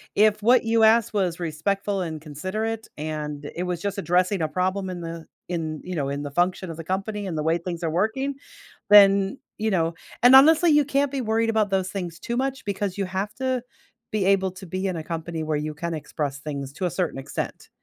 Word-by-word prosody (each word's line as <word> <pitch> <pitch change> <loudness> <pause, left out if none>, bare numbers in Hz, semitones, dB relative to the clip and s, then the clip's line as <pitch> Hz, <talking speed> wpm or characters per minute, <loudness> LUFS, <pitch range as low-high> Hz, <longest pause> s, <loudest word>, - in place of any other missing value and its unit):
If 215 0 +4
what 240 +3 +5
you 225 0 +3
asked 220 0 +5
was 180 -4 0
respectful 195 +5 -1
and 160 -4 -4
considerate, 210 +9 -4
and 150 -1 -4
it 175 - -2
was 180 -2 -3
just 200 -1 -3
addressing 185 0 +1
a 160 - +1
problem 185 +4 -1
in 180 -1 -5
the 165 -1 -6 0.2
in, 160 -3 -3
you 180 0 -5
know, 140 -3 -1
in 140 +1 -3
the 145 - -5
function 175 +3 0
of 165 - -6
the 165 - -6
company, 200 +4 -3
and 165 - -3
the 155 - -1
way 160 +2 +2
things 170 0 -5
are 165 - +1
working, 220 - 0 0.5
then, 200 +2 +6 0.2
you 220 +1 0
know 165 -3 +1 0.3
and 245 +2 +8
honestly, 320 +5 +7
you 295 -1 +5
can't 280 0 +1
be 275 - -1
worried 225 -1 +1
about 215 -2 +1
those 190 -1 0
things 180 -4 -5
too 235 +4 -4
much, 265 0 -2
because 200 -1 -2
you 200 - +1
have 190 +2 -3
to 260 -1 -1 0.5
be 210 -3 0
able 190 -1 +3
to 185 0 -10
be 185 +3 -3
in 185 - -2
a 160 - -5
company 165 0 -4
where 155 -1 -1
you 150 0 -4
can 170 +2 -4
express 145 -2 -4
things 140 -2 -5
to 180 +4 -2
a - - -1
certain 175 -5 -2
extent. 135 - -5
185 Hz, 220 wpm, -24 LUFS, 165-215 Hz, 0.5 s, and